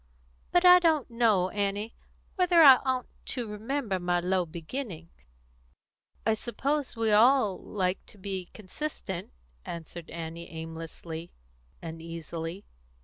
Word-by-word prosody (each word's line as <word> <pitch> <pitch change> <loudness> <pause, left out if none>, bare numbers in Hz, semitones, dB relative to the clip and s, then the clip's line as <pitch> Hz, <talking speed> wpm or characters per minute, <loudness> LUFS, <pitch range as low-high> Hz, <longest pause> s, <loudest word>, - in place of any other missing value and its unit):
But 355 +1 +4
I 360 0 +10
don't 315 -7 +2
know, 220 -6 +3
Annie, 205 +2 -1 0.4
whether 355 -3 +5
I 270 -3 +10
oughtn't 260 -1 -3
to 245 -3 -3
remember 215 -1 -2
my 175 0 +1
low 180 0 0
beginnings." 170 - -7 1.0
"I 220 - +4
suppose 270 +5 -2
we 225 -1 +1
all 220 -2 +5
like 185 -2 -2
to - - -14
be 190 -2 -4
consistent," 195 - -6 0.3
answered 170 0 -8
Annie 165 0 -6
aimlessly, 165 +1 -7 0.5
uneasily. 165 +2 -6
200 Hz, 115 wpm, -29 LUFS, 170-250 Hz, 1.0 s, I